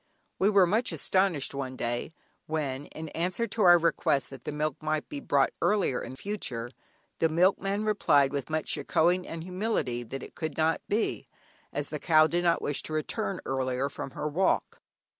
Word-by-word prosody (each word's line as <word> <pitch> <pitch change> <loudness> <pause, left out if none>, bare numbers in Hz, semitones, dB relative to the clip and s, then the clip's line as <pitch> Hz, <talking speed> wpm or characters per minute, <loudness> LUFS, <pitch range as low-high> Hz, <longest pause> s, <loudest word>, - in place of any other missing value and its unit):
We 195 - +4
were 200 -3 +6
much 220 +7 +1
astonished 185 -8 +1
one 135 -2 -4
day, 120 +4 -3 0.4
when, 145 -3 -2
in 160 0 -8
answer 180 +9 -1
to 230 - -4
our 175 -3 +8
request 165 -5 +1
that 135 -3 -11
the - - -2
milk 150 +2 -2
might 155 0 -1
be 290 - -5
brought - - +2
earlier 200 -11 +2
in 130 - -7
future, 125 - -4 0.5
the 165 - +3
milkman 195 +5 +2
replied 145 -10 +3
with 140 +1 -3
much 155 0 -1
"shekkohing" 180 +3 +1
and 165 0 -6
humility 180 - -1
that 130 +3 -6
it - - -10
could 155 -2 -5
not 160 0 +2
be, 215 +2 -1 0.4
as - - -3
the - - -4
cow 155 -2 +5
did 175 +2 0
not 170 -1 +2
wish 145 - 0
to 155 - -7
return 190 +5 -2
earlier 130 0 -1
from 140 - -6
her 150 - -1
walk. 180 +6 0
160 Hz, 180 wpm, -28 LUFS, 140-185 Hz, 0.5 s, our